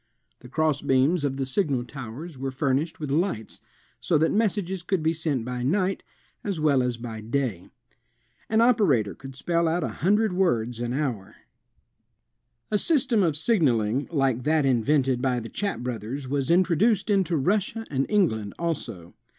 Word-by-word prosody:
The 125 - -13
cross 155 0 +1
beams 140 +4 +2
of 135 -2 -1
the 135 - -1
signal 130 -3 0
towers 135 +5 -8
were 135 +1 -4
furnished 135 +4 -1
with 150 -3 -4
lights, 145 - -1 0.4
so 165 - +1
that 160 +2 +2
messages 200 -4 0
could 180 -1 -1
be 160 +1 +2
sent 155 -7 -2
by 125 0 -4
night 185 +8 0 0.4
as 195 -6 -2
well 145 -4 +3
as 125 -2 -1
by 115 -2 -7
day. 115 -5 -2 0.8
An 220 +1 +3
operator 185 - +3
could 135 -1 -11
spell 170 +4 0
out 165 +1 0
a - - -1
hun 190 +6 +1
dred 215 -2 +1
words 120 -11 0
an 120 0 -2
hour. 125 -9 -3 1.4
A 210 - +3
S}'stem 250 -4 +2
of 160 -5 +1
signaling 135 - +1
like 135 -6 +1
that 155 +2 +2
invented 130 0 +2
by 130 -2 +1
the 115 0 -7
Chappe 200 -10 -3
brothers 125 +3 -4
was 140 0 -1
introduced 185 +5 +3
into 190 -4 +2
Russia 205 - 0
and 135 -1 0
England 110 - +1
also. 115 - -4
145 Hz, 165 wpm, -25 LUFS, 125-180 Hz, 1.4 s, well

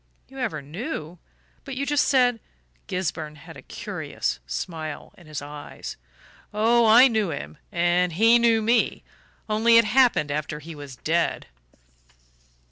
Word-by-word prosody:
"You 270 0 -11
ever 155 - -3
knew? 170 - -6 0.4
But 270 -2 -7
you 275 +2 -2
just 290 +1 +2
said 245 -3 +3 0.2
" - - -39
Gisburn 160 -4 -3
had 145 - -13
a - - -11
curious 60 -1 -4
smile 155 - -5
in 175 - -18
his 150 -2 -6
eyes. 145 0 -8 0.6
"Oh, 230 +2 +3
I 240 +4 +8
knew 220 -6 0
him, 80 - -7
and 175 0 +1
he 225 +6 +5
knew 230 -2 +3
me 230 +1 +1 0.4
only 225 +2 +4
it 230 - +6
happened 225 - +3
after 150 0 -3
he 160 +2 -9
was 145 -3 -10
dead." 165 +6 -1
180 Hz, 145 wpm, -24 LUFS, 150-235 Hz, 0.6 s, I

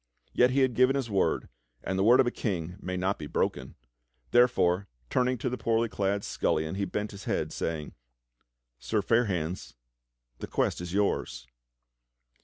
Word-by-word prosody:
Yet 125 - +5
he 135 +2 +2
had 130 -2 +3
given 130 +3 +4
his 130 -5 -2
word, 95 -2 +1 0.4
and 95 - -2
the 95 - +1
w^ord 120 +4 +7
of 135 - +6
a 120 - 0
King 90 -8 -3
may 90 0 -3
not 95 +2 -1
be 75 - -6
broken; 65 -2 -2 0.6
therefore, 100 -6 +3 0.2
turning 125 0 +2
to 125 - -3
the 125 0 -2
poorly 115 0 +1
clad 100 0 -1
scullion, 80 +2 -1
he 100 +1 -1
bent 105 +3 -3
his 100 -1 -10
head, - - -1
saying: 80 -2 -3 0.9
"Sir 105 - -1
Fair 115 +4 +3
hands, 85 - -3 0.6
the - - -5
quest - - 0
is 90 -1 -6
yours." 85 -11 -1
100 Hz, 170 wpm, -28 LUFS, 90-120 Hz, 0.9 s, w^ord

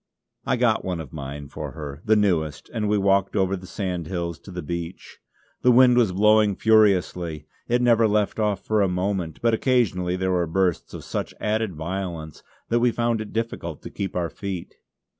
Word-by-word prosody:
I - - +2
got - - +2
one 90 -2 -3
of 75 -5 -8
mine 70 -1 -6
for - - -6
her, 75 -2 -7
the 110 0 +4
newest; 80 -9 0
and 105 -3 -1
we 105 - +3
walked 100 0 +2
over 95 -1 +2
the 95 -1 -9
sandhills 90 -3 -3
to - - -14
the 90 -1 -6
beach. 85 +3 -6 0.4
The 125 - +5
wind 125 0 +6
was 120 -6 +3
blowing 105 +1 +4
furiously. 90 -8 +2 0.2
It 120 +1 +2
never 115 -2 +5
left 105 0 0
off 105 -3 0
for 110 -1 +2
a 100 - +3
moment; 90 -2 -2
but 115 -1 +3
occasionally 110 -8 +1
there 95 0 -1
were 90 -2 +1
bursts 90 +1 0
of - - -8
such - - -4
added 110 -3 -1
violence 85 -2 -5 0.3
that 120 - +2
we 120 +1 +4
found 115 -1 0
it 110 - -7
difficult 110 -9 -4
to - - -8
keep 95 -2 -4
our 85 -3 -1
feet. 95 -1 -6
95 Hz, 190 wpm, -24 LUFS, 85-110 Hz, 0.4 s, wind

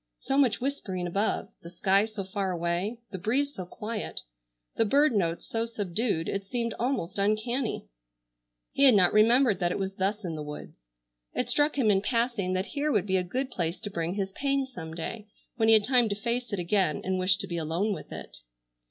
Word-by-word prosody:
So 270 - -2
much 275 -5 +3
whispering 210 -10 -3
above, 200 +3 -1
the 170 - -10
sky 195 +3 +2
so 215 -2 -5
far 195 0 -2
away, 175 +6 -1
the 190 - -5
breeze 270 +9 0
so 185 -8 -7
quiet, 215 +2 -5 0.5
the - - +3
bird 280 +5 +4
notes 170 -5 0
so 230 0 -1
subdued, 205 -5 -1
it 195 -1 -3
seemed 235 0 -1
almost 230 -7 -1
uncanny. 215 - 0 0.9
He 280 - +4
had 255 -5 +8
not 180 -3 +5
remembered 225 -1 +5
that 175 -2 +1
it - - -1
was 195 0 -3
thus 200 +2 -1
in 170 - -3
the 155 - -5
woods. 150 - -9 0.5
It 250 - -1
struck 290 +4 +2
him 230 -6 +4
in 195 -1 +3
passing 230 -5 0
that 185 +1 0
here 295 +1 0
would 205 -6 +2
be 190 -2 +2
a 180 - +1
good 255 +9 -3
place 170 -4 -2
to 205 - -4
bring 170 +1 -2
his 195 -2 -2
pain 275 +2 0
some 165 -12 -8
day 210 +6 -5 0.3
when 220 - +2
he 225 - +9
had 215 - +4
time 245 -1 +3
to 200 - -1
face 235 +4 -2
it 205 - -1
again, 180 -2 +1
and 185 0 -1
wished 185 0 +2
to 195 - -5
be 170 -2 -3
alone 170 +6 0
with - - -8
it. - - -8
205 Hz, 210 wpm, -28 LUFS, 185-240 Hz, 0.9 s, he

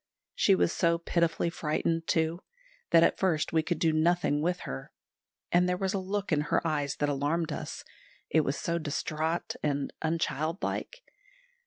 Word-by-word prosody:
She 195 - +4
was 175 - +2
so 170 -1 +2
pitifully 170 0 0
frightened, 165 +1 -1
too, 160 +1 +1 0.5
that 165 -1 +6
at - - +2
first 165 -6 +1
we 160 - +4
could 175 +1 -2
do 160 -1 +2
nothing 155 -2 +2
with 175 +2 0
her; 65 0 -6 0.6
and 180 +1 +4
there 180 - +1
was 190 0 -1
a 195 - 0
look 195 +1 -3
in 150 -2 +3
her 150 +2 0
eyes 145 -3 0
that 145 - 0
alarmed 150 +4 0
us, - - -5 0.4
it 160 - +3
was 140 -1 -1
so 170 0 -1
distraught 155 +2 -2
and 145 -2 -1
unchildlike. 165 - -2
165 Hz, 165 wpm, -29 LUFS, 150-175 Hz, 0.6 s, that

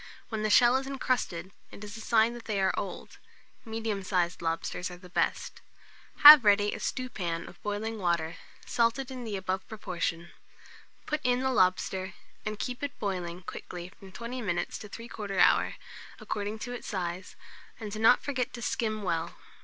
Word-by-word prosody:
When 220 -2 -3
the 215 - 0
shell 240 +4 +6
is 265 0 -4
incrusted, 245 -10 -2 0.2
it 205 - -11
is 205 0 -8
a 225 - -8
sign 225 +1 +3
they 210 -3 -1
are 190 0 +2
old: 195 -3 -6 0.4
medium 220 -3 -3
sized 180 -2 0
lobsters 165 +2 -2
are 180 - -9
the 180 0 -15
best. - - -1 0.6
Have 295 -3 +13
ready 205 0 +4
a - - -5
stewpan 185 -10 -3
of 175 - -14
boiling 210 +2 -3
water, 170 -3 0 0.3
salted 240 +3 +1
in 250 -2 -6
the 210 -3 -3
above 190 0 -3
proportion; 170 -5 -3 0.7
put 300 0 -2
in 250 0 +2
the 265 0 +1
lobster, 185 -2 +1 0.3
and 215 0 -3
keep 250 +3 -4
it 285 -1 -4
boiling 180 -3 -3
quickly 175 0 -7
from 190 0 -15
20 235 +5 -6
minutes 175 -5 -2
to 210 - -9
3/4 210 -3 -6
hour, - - +4 0.4
according 205 +1 -3
to 245 +3 -6
its 245 - -7
size, 185 -2 -4 0.4
and 215 -3 -6
do 215 - -5
not 225 +3 +5
forget 255 -3 -2
to 240 - -7
skim 215 -2 -1
well. 165 -3 -2
210 Hz, 170 wpm, -29 LUFS, 185-235 Hz, 0.7 s, Have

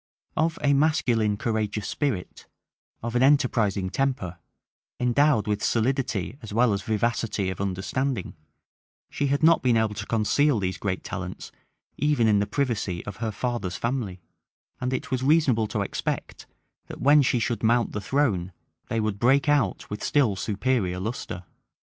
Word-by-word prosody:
Of 165 +1 +1
a 140 0 +4
masculine, 125 -8 +2
courageous 105 -2 -2
spirit, 130 -12 -3 0.6
of 115 +1 -3
an 120 - +3
enterprising 115 -9 +2
temper, 125 -11 -1 0.6
endowed 125 -1 +3
with 105 -1 -1
solidity 120 -2 0
as 110 - -9
well 115 +1 +3
as 100 - -2
vivacity 110 -2 -1
of 95 - -6
understanding, 100 +4 -2 0.8
she 145 - -1
had 140 +2 0
not 165 +1 +6
been 125 -3 +3
able 110 -1 +1
to 100 0 -6
conceal 120 +5 +2
these 95 -3 -2
great 95 -1 -2
talents - - -6 0.5
even 145 -5 +2
in 105 -2 +4
the 100 - 0
privacy 110 -10 -2
of 105 - -7
her 115 -1 -2
father's 105 -4 -3
family; 115 -7 -3 0.6
and 125 0 -2
it 130 - -3
was 130 -1 0
reasonable 130 -6 +3
to 105 - -2
expect, - - -4 0.4
that - - -9
when 145 +2 +6
she 125 -2 +2
should 120 0 -1
mount 115 0 +2
the 105 - -4
throne, 100 -7 0 0.3
they 115 - -1
would 105 -2 -1
break 135 +5 +3
out 140 -10 +1
with 105 - -5
still 130 -9 +2
superior 100 -2 -1
lustre. 95 -3 -5
115 Hz, 155 wpm, -25 LUFS, 100-135 Hz, 0.8 s, not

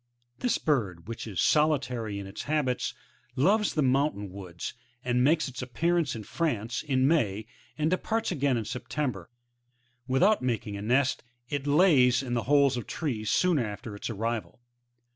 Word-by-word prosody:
This 245 - +1
bird, 100 - -1
which 115 0 -6
is 95 -6 -5
solitary 125 - +1
in 100 - -5
its 95 +1 -7
habits, 140 -4 0 0.4
loves 200 +10 +2
the 155 - +2
mountain 130 -7 +1
woods, 90 -3 -7 0.3
and 125 0 +2
makes 155 +4 +3
its 130 -1 -6
appearance 155 +4 0
in 110 - -6
France, 120 -6 -2
in 130 -3 +1
May, 110 -10 +1 0.3
and 155 +2 +1
departs 220 +4 0
again 140 -6 +1
in 110 - -3
September; 125 - -4 0.8
without 185 +12 +3
making 115 -5 -2
a 100 - -5
nest, 130 +5 +1 0.3
it 145 -1 -3
lays 140 -6 +5
in 120 -2 -2
holes 140 +2 +3
in 120 - -4
trees 115 -9 -3
soon 180 +4 +3
after 105 -2 -4
its 100 - -5
arrival. 115 +1 -3
130 Hz, 155 wpm, -28 LUFS, 110-150 Hz, 0.8 s, lays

